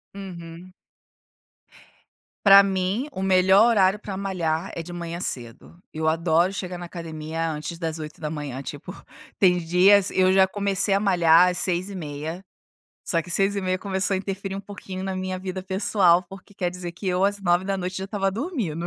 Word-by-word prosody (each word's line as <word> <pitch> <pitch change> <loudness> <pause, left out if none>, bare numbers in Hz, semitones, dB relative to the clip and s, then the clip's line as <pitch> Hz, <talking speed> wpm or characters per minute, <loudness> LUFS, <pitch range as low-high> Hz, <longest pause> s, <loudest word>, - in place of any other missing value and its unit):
Uhum. 180 -2 -9 1.7
Pra 200 0 +9
mim, 195 +7 -1
o 190 - -6
melhor 190 +3 +5
horário 200 -3 +3
pra 200 -3 -6
malhar 180 -3 -2
é 170 - -4
de 175 +2 -9
manhã 170 0 -5
cedo. 125 0 -5 0.2
Eu 160 0 -2
adoro 165 +3 +2
chegar 185 -2 -5
na 175 - -7
academia 165 -1 -5
antes 155 +2 -5
das 165 -1 -4
8h. 150 -3 -6
Tipo, - - -8 0.4
tem 180 -2 +4
dias 185 +4 +4
eu 185 0 +3
já 190 0 +5
comecei 200 0 +1
a 195 - +3
malhar 175 -3 +5
às 180 - -3
6:30, 175 -3 -3 0.6
só 170 -3 0
que 170 - -10
seis 195 +2 +1
e - - 0
meia 185 0 0
começou 195 0 -1
a - - +1
interferir 195 0 -4
um 195 - -4
pouquinho 195 -2 -8
na 190 -1 -3
minha 185 0 -4
vida 190 0 -5
pessoal, 190 -2 +2
porque 195 +2 -13
quer 180 -3 -2
dizer 180 -1 -7
que 185 +3 -9
eu 180 +1 +1
às 200 0 0
21h 185 +1 0
já 190 0 -4
tava 195 -1 -1
dormindo. 205 - -3
185 Hz, 170 wpm, -24 LUFS, 170-195 Hz, 1.7 s, Pra